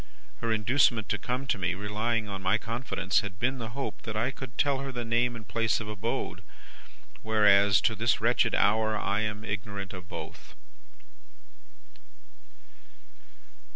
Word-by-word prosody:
Her 115 - -2
inducement 115 0 +2
to 105 - 0
come 125 +2 -3
to 125 -6 0
me, 90 +1 0
relying 105 +2 -1
on 100 -1 -5
my 95 +3 +2
confidence, 115 +3 -1
had 100 -4 -6
been 130 +3 0
the 115 +2 -6
hope 140 - -4
that 110 -2 -6
I 120 +5 +1
could 130 -2 -9
tell 140 -2 +2
her 135 0 -4
the 120 -2 -4
name 120 +1 +1
and 110 -2 -10
place 110 +1 +1
of 110 - -6
abode. 105 -2 -3 0.8
Whereas, 100 -3 +5
to 110 - +2
this 110 +1 +1
wretched 115 0 +2
hour 110 +1 +3
I 105 0 0
am 105 0 -3
ignorant 100 -2 -4
of 90 -1 -9
both. - - -8
110 Hz, 155 wpm, -29 LUFS, 105-120 Hz, 0.8 s, Whereas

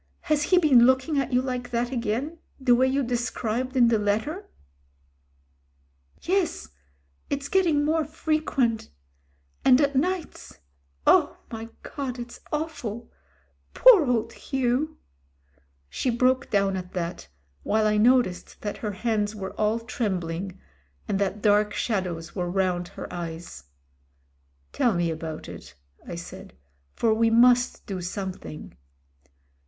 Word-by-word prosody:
"Has 305 -1 +1
he 365 +5 +3
been 265 -8 +6
looking 260 +3 +2
at 275 - -2
you 250 0 +2
like 250 -1 -3
that 240 +1 -1
again, 255 +7 -2 0.2
the 260 -2 +4
way 255 +2 +4
you 270 +1 +1
described 245 +1 -2
in 240 -2 +6
the 225 -2 +2
letter?" 220 - -1 1.7
"Yes 365 - 0 0.3
— 70 0 -40
it's 280 0 -2
getting 325 -5 +2
more 315 +1 +2
frequent. 305 -7 -1 0.7
And 255 -1 +6
at 285 -1 +2
nights 355 +5 -2 0.2
— 70 0 -41
oh! - - +4
my 225 0 -6
God! 265 -3 -5
it's 240 -1 -8
awful. 250 -8 -4 0.6
Poor 435 - +7
old 230 -2 0
Hugh." 265 +3 -1 0.9
She 255 - -2
broke 255 +3 +2
down 195 -1 +2
at 180 -1 -6
that, 175 - -4 0.3
while 215 0 +1
I 210 0 +2
noticed 235 -4 +2
that 205 - -4
her 210 -2 -4
hands 210 0 -1
were 190 -2 -6
all 215 +1 +1
trembling, 190 -5 -3 0.5
and 195 - 0
that 200 +1 -2
dark 210 0 +3
shadows 180 -7 -2
were 180 -2 -2
round 180 -1 0
her - - -8
eyes. 165 - -7 1.1
"Tell 235 -5 +2
me 170 -1 +1
about 160 -1 -6
it," - - -11 0.3
I - - -5
said, - - -9 0.4
"for 225 - +2
we 225 +1 +3
must 245 +2 +4
do 190 -2 -4
some 190 +1 -4
thing." 150 - -10
235 Hz, 135 wpm, -26 LUFS, 195-265 Hz, 1.7 s, Poor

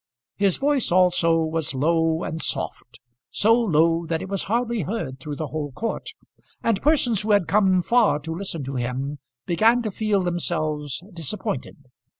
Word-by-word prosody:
His 200 -3 +1
voice 280 -5 +1
also 175 -2 +4
was 160 -3 -2
low 160 +3 +1
and 160 +1 -4
soft; 120 -1 -3 0.3
so 220 +2 +3
low 165 -7 +2
that 165 0 -1
it 190 - -7
was 195 -1 -2
hardly 235 +1 0
heard 150 - -4
through 145 +2 -6
the 155 0 -4
whole 150 -2 -4
court, 225 - -4 0.6
and 225 -4 +1
persons 265 -8 +2
who 215 - -5
had 200 -4 +3
come 190 -3 +3
far 230 -5 +3
to 160 +2 -5
listen 170 -4 -4
to 135 +1 -5
him 130 +4 -3 0.3
began 225 +8 +3
to 215 - -2
feel 210 -1 0
themselves 155 -4 -2
disappointed. 165 -4 -4
170 Hz, 160 wpm, -23 LUFS, 155-210 Hz, 0.6 s, also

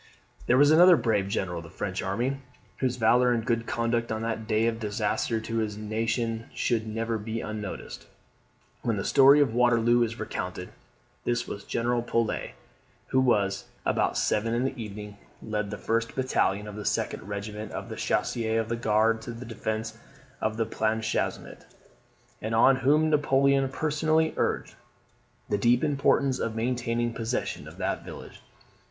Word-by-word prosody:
There 125 - +4
was 145 +2 +6
another 175 +2 +8
brave 110 -5 +1
general 95 -3 -2
of - - -9
the 85 - -11
French 95 +2 -4
army, 120 +8 -1 0.4
whose 130 -2 0
valour 125 +1 +4
and 115 -2 0
good 115 -1 0
conduct 115 0 -1
on 110 0 -2
that 110 -1 -3
day 110 0 +2
of 115 -1 0
disaster 105 +1 -1
to 115 +1 -4
his 105 -2 -2
nation 115 +1 -2
should 115 -2 0
never 115 +1 -2
be 110 +2 -4
unnoticed 105 -3 -6 0.7
when 115 -3 -1
the 100 - -3
story 140 +2 +7
of 130 -6 +2
Waterloo 120 0 +4
is 115 0 -1
recounted. 90 0 -4 0.5
This 120 0 -1
was 100 - -6
General 120 +1 0
Polet, 115 -1 -1 0.6
who, 130 -1 +3 0.5
about - - +1
seven 115 +2 +1
in 120 - +1
the 135 - -1
evening, 105 -3 -7 0.2
led 105 -2 -3
the 105 - -5
first 115 +2 -1
battalion 105 -6 0
of 105 - -8
the 105 - -6
2d - - -1
regiment 105 +2 -6
of - - -5
the - - -6
Chasseurs 115 -2 0
of 110 0 -2
the 115 - 0
Guard 115 0 +2
to 120 - -6
the 115 +2 -8
defence 110 -1 -4 0.4
of 110 0 -1
Planchenoit; 110 0 -2 0.8
and 110 +1 -2
on 130 +4 +6
whom 150 +4 +3
Napoleon 140 -2 +3
personally 155 +2 +1
urged - - -1 0.8
the 105 - +1
deep 120 +5 +3
importance 140 -2 +2
of 115 -1 -2
maintaining 120 0 -1
possession 115 +2 -3
of - - -12
that - - -2
village. - - -10
115 Hz, 160 wpm, -27 LUFS, 110-125 Hz, 0.8 s, another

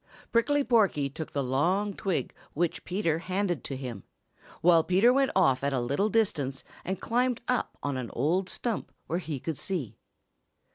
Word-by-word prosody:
Prickly 285 +5 +3
Porky 200 - +2
took 155 +2 -6
the 140 - -1
long 180 +11 +1
twig 195 -4 -2 0.2
which 170 +2 -1
Peter 175 -4 0
handed 185 -1 -1
to 135 - -4
him, 125 -6 -6 0.6
while 165 -1 +6
Peter 195 +9 +4
went 275 0 +3
off 135 0 +3
at 140 0 +1
a 130 - +1
little 140 - 0
distance 150 -12 0 0.2
and 190 +1 -3
climbed 245 +1 +1
up 250 -1 -1
on 140 -2 -1
an 125 -2 -4
old 180 +6 +1
stump 230 +2 -3
where 170 - -1
he 155 -6 -4
could 160 +2 -4
see. 170 - -3
175 Hz, 170 wpm, -28 LUFS, 140-210 Hz, 0.6 s, while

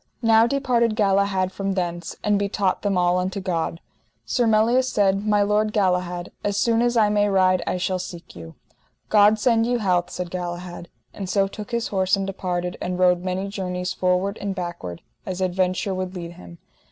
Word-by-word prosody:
Now 225 0 +5
departed 240 -4 +1
Galahad 195 -2 +1
from 195 0 -2
thence, 175 -2 -3
and 205 -1 +2
betaught 200 -1 0
them 200 -2 0
all 180 0 +2
unto 185 +2 -2
God. 170 -3 -2 0.5
Sir 245 -3 +1
Melias 225 +4 +3
said: 200 0 +1
My 205 -1 +3
lord 210 +1 +1
Galahad, 180 -3 0
as 205 -1 -1
soon 230 +2 +2
as 240 0 +1
I 215 -2 +4
may 205 0 +2
ride 185 -2 +3
I - - 0
shall 185 0 -1
seek 175 -2 -9
you. 80 -2 -10 0.5
God 210 0 +5
send 230 +1 +2
you 245 0 +1
health, 180 -5 +1
said 180 -1 -5
Galahad, 175 -1 -6 0.2
and 195 -2 -6
so 195 0 +2
took 210 +1 -8
his 235 -1 -2
horse 190 -1 +2
and 195 0 -2
departed, 180 -2 -3
and 180 0 -2
rode 180 -1 +3
many 185 +1 -2
journeys 180 -2 -3
forward 185 +2 0
and 200 -1 -3
backward, 170 - -6 0.2
as 185 -1 -5
adventure 185 +2 0
would 185 0 -4
lead 170 -1 -6
him. 85 - -13
190 Hz, 185 wpm, -23 LUFS, 180-210 Hz, 0.5 s, Now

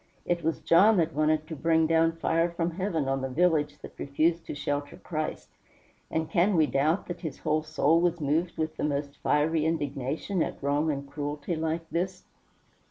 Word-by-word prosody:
It 175 -1 -1
was 160 +1 -1
John 200 +6 +5
that 165 -2 +1
wanted 155 +1 +1
to 160 - -6
bring 160 +2 +2
down 165 0 +3
fire 165 +1 +1
from 170 0 -2
heaven 170 -5 -2
on 135 0 0
the 135 - -2
village 150 0 +1
that - - -9
refused 160 +4 0
to - - -5
shelter 145 0 -3
Christ, 155 -2 -4 0.6
and 160 0 -1
can 180 +4 +2
we 160 -2 +5
doubt 150 +6 +1
that 175 - -6
his 160 -6 -5
whole 155 0 0
soul 155 +1 +2
was 175 -1 +1
moved 160 +4 0
with 155 0 -2
the - - -3
most 140 -1 -2
fiery 155 +2 +2
indignation 155 +3 -2
at - - -2
wrong 145 +3 +1
and 140 -1 -5
cruelty 145 +3 -4
like 160 +1 -2
this? 180 +2 -2
160 Hz, 185 wpm, -28 LUFS, 145-170 Hz, 0.6 s, John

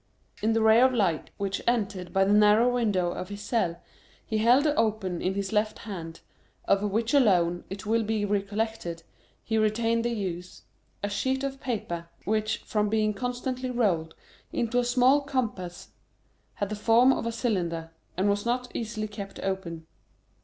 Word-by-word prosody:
In 220 +1 +2
the 225 0 +2
ray 220 +2 +6
of 260 0 +4
light 185 -8 +1
which 200 0 -2
entered 200 -7 0
by 195 - +3
the 200 - +3
narrow 210 +4 +5
window 205 -8 +1
of 180 - -6
his 205 0 -7
cell, 185 -7 -1 0.5
he 220 -2 -1
held 245 +6 +5
open 220 - 0
in 185 +1 -1
his 200 0 -3
left 215 0 +1
hand, 170 -6 -7 0.4
of 195 - +3
which 220 +4 0
alone, 180 -10 +3
it 195 +2 -7
will 225 +2 +2
be 215 -1 -1
recollected, 200 -4 -2 0.4
he 220 -1 0
retained 225 +2 +1
the 240 - 0
use, 185 -5 -5 0.4
a - - +1
sheet 265 +5 -1
of 270 -1 -4
paper, 175 -9 -3 0.2
which, 215 +1 0
from 210 -1 0
being 215 0 +1
constantly 250 +3 -3
rolled 185 -10 0 0.4
into 240 +1 0
a - - +2
small 255 +3 +4
compass, 225 -11 -3 0.7
had 205 - -2
the 210 - -3
form 235 +5 +5
of 230 - -3
a - - -1
cylinder, 175 -9 -2 0.3
and 190 +2 +2
was 205 0 +1
not 245 +1 -1
easily 215 -2 -3
kept 200 -2 -8
open. 185 -4 -4
215 Hz, 165 wpm, -27 LUFS, 195-235 Hz, 0.7 s, ray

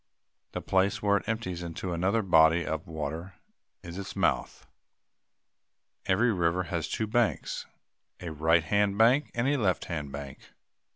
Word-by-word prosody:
The - - -4
place 95 +2 +1
where 100 0 +4
it 100 - -7
empties 100 -6 -3
into 85 +1 -4
another 95 +6 +1
body 80 -2 +5
of 80 0 -4
water 80 +3 -5 0.5
is 85 +2 -7
its 100 -1 -7
mouth. - - 0 1.4
Every 110 +5 +3
river 90 0 +1
has 85 -1 -3
two 110 - -2
banks 115 +1 -1 0.5
a 85 -2 -6
right 80 +2 +3
hand 100 +4 +1
bank 125 +7 +4
and 120 +2 +1
a 145 +1 +2
left 95 -7 0
hand 75 -5 -4
bank. 70 -1 -9
90 Hz, 150 wpm, -28 LUFS, 80-105 Hz, 1.4 s, body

